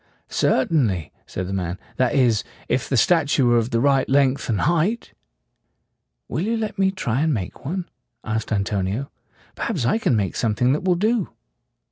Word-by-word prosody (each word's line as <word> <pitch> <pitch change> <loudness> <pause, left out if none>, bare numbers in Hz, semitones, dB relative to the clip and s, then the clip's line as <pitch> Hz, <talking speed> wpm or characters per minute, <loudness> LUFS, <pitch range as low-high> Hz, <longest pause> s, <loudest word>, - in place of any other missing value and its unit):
"Cer 130 - +2
tain 150 -7 +2
ly," 90 -6 -3 0.2
said 90 - -4
the 95 - -5
man; 90 -2 -2 0.2
"that 130 +1 +2
is, 120 -6 +3 0.2
if 130 - -1
the 135 - +1
statue 145 +1 +3
were 120 -1 +4
of 115 +1 -2
the 115 - +1
right 135 +1 +2
length 135 -1 +2
and 105 -4 +1
height." 175 +8 0 1.1
"Will 145 - -2
you 225 +5 0
let 215 -2 -4
me 190 0 +4
try 135 - -1
to 160 - +2
make 115 - -3
one?" 180 +4 -3 0.4
asked 110 0 -3
Anto 100 -1 0
nio 105 +9 -3 0.4
"Perhaps 170 - -2
I 220 - +2
can 140 - +2
make 100 -4 -1
something 120 +3 +1
that 150 - -1
will 185 -1 +2
do." 215 +2 +1
130 Hz, 185 wpm, -22 LUFS, 110-170 Hz, 1.1 s, were